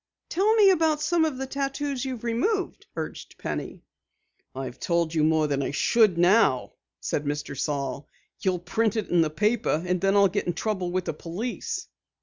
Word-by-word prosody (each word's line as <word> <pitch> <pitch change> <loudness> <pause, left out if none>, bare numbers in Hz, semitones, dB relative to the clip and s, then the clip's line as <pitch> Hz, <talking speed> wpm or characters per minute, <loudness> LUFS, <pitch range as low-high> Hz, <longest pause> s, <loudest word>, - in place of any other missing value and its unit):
"Tell 410 +6 +2
me 410 -3 +7
about 320 -4 +2
some 330 +1 +2
of 300 -5 -2
the 265 - -3
tattoos 275 0 -2
you've 255 -4 -5
removed," 340 - -1
urged - - -6
Penny. - - -5 0.7
"I've 130 -1 -6
told 170 -2 0
you 155 -2 +2
more 155 0 +3
than 140 -2 0
I - - -1
should 205 +5 +3
now," 175 - +3 0.3
said 145 - -2
Mr. 145 -1 -3
Saal. 140 -1 -3 0.3
"You'll 185 -3 +1
print 215 +5 0
it 220 - -2
in 175 -1 +4
the 160 - +2
paper 205 0 +1
and 180 -1 0
then 195 +1 +2
I'll 200 -1 +6
get 195 +1 -2
into 175 -2 -2
trouble 190 -5 -1
with 185 0 -1
the - - -2
police." 180 +11 -5
195 Hz, 180 wpm, -26 LUFS, 160-260 Hz, 0.7 s, me